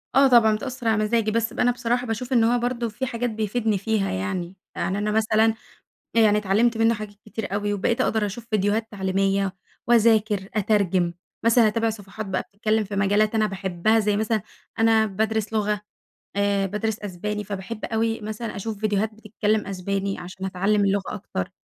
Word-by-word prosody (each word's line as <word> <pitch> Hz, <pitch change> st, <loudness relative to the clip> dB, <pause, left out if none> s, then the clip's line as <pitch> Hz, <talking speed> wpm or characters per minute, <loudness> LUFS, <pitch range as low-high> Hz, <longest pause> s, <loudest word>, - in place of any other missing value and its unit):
آه 275 Hz, +1 st, +7 dB
طبعًا 230 Hz, -4 st, +5 dB
بتأثر 255 Hz, +1 st, -5 dB
على 220 Hz, -1 st, +3 dB
مزاجي 220 Hz, 0 st, +1 dB
بس 230 Hz, 0 st, 0 dB
ب -, -, -8 dB
أنا 245 Hz, -, +4 dB
بصراحة 245 Hz, +1 st, -1 dB
باشوف 240 Hz, +3 st, -3 dB
إن 235 Hz, -2 st, +5 dB
هو 240 Hz, +2 st, +3 dB
برضه 240 Hz, -1 st, -1 dB
في 245 Hz, +5 st, -4 dB
حاجات 245 Hz, -1 st, -2 dB
بيفيدني 220 Hz, 0 st, 0 dB
فيها 205 Hz, 0 st, 0 dB
يعني، 170 Hz, -, -3 dB, 0.2 s
يعني 190 Hz, -, -1 dB
أنا 210 Hz, +1 st, -1 dB
مثلًا 220 Hz, +1 st, +3 dB, 0.6 s
يعني 215 Hz, -2 st, +5 dB
اتعلمت 210 Hz, +4 st, +2 dB
منه 225 Hz, +1 st, +4 dB
حاجات 210 Hz, -1 st, -7 dB
كتير 215 Hz, -2 st, -5 dB
أوي 205 Hz, 0 st, 0 dB
وبقيت 215 Hz, +5 st, 0 dB
أقدر 220 Hz, -4 st, +1 dB
أشوف 215 Hz, +3 st, -7 dB
فيديوهات 215 Hz, +1 st, +1 dB
تعليمية 195 Hz, -1 st, 0 dB, 0.3 s
وأذاكر، 220 Hz, -4 st, +3 dB
أترجم، 195 Hz, -4 st, +2 dB, 0.3 s
مثلًا 230 Hz, -1 st, +5 dB
أتابع 225 Hz, +1 st, +1 dB
صفحات 215 Hz, 0 st, -7 dB
بقى 190 Hz, -1 st, -1 dB
بتتكلم 215 Hz, +1 st, +1 dB
في 200 Hz, 0 st, -6 dB
مجالات 205 Hz, +2 st, +2 dB
أنا 215 Hz, -1 st, +3 dB
باحبها 195 Hz, +2 st, +1 dB
زي 210 Hz, -1 st, +1 dB
مثلًا 220 Hz, 0 st, 0 dB, 0.4 s
أنا 225 Hz, -1 st, +4 dB
بادرس 220 Hz, +1 st, -1 dB
لغة، 210 Hz, -1 st, 0 dB, 0.6 s
آآ 200 Hz, -1 st, +2 dB
بادرس 210 Hz, +2 st, -2 dB
أسباني 210 Hz, +2 st, -4 dB
فباحب 205 Hz, +2 st, -6 dB
أوي 225 Hz, 0 st, 0 dB
مثلًا 215 Hz, +1 st, -5 dB
أشوف 210 Hz, +2 st, -4 dB
فيديوهات 215 Hz, +1 st, 0 dB
بتتكلم 215 Hz, 0 st, -1 dB
أسباني 195 Hz, +1 st, -2 dB
عشان 185 Hz, +2 st, -8 dB
أتعلم 200 Hz, +3 st, +1 dB
اللغة 200 Hz, 0 st, 0 dB
أكتر. 140 Hz, -, -4 dB
215 Hz, 170 wpm, -24 LUFS, 200-225 Hz, 0.6 s, آه